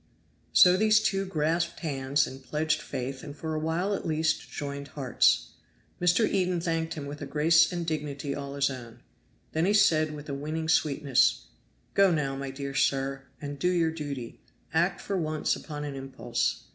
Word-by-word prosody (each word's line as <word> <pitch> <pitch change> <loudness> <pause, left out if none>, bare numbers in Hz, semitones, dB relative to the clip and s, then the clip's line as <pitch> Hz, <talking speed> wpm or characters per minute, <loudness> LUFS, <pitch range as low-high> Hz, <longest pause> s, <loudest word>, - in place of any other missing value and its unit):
So 180 0 +7
these 215 +1 +5
two 195 -2 0
grasped 165 0 -1
hands 140 -2 +1
and 135 0 -9
pledged 155 +2 0
faith 130 0 -5
and 145 -2 -8
for 160 0 -4
a 155 - -1
while 165 +6 0
at 195 - -3
least 160 0 0
joined 140 -1 -5
hearts. 135 -2 +2 0.5
Mr. 180 +5 +4
Eden 180 -2 +1
thanked 165 -1 -1
him 150 -3 -5
with 145 +1 -7
a - - -5
grace 160 +2 +4
and 175 -1 -3
dignity 150 -3 -3
all 140 0 -6
his 140 0 +1
own. 120 -2 -9 0.5
Then 160 +2 +1
he 205 +2 +3
said 155 -6 +4
with 145 0 -9
a 140 - -4
winning 155 +3 -3
sweetness, 140 -4 +2 0.5
"Go 195 -1 +5
now, 145 -5 0
my 135 0 -4
dear 140 +1 -5
sir, 135 0 0
and 145 -1 -6
do 180 - +2
your 170 -3 +2
duty. 140 -7 -6 0.3
Act 175 +3 +2
for 200 - -2
once 155 -3 0
upon 150 -2 -7
an 145 -1 -4
impulse. 135 0 -2
155 Hz, 180 wpm, -28 LUFS, 140-165 Hz, 0.5 s, So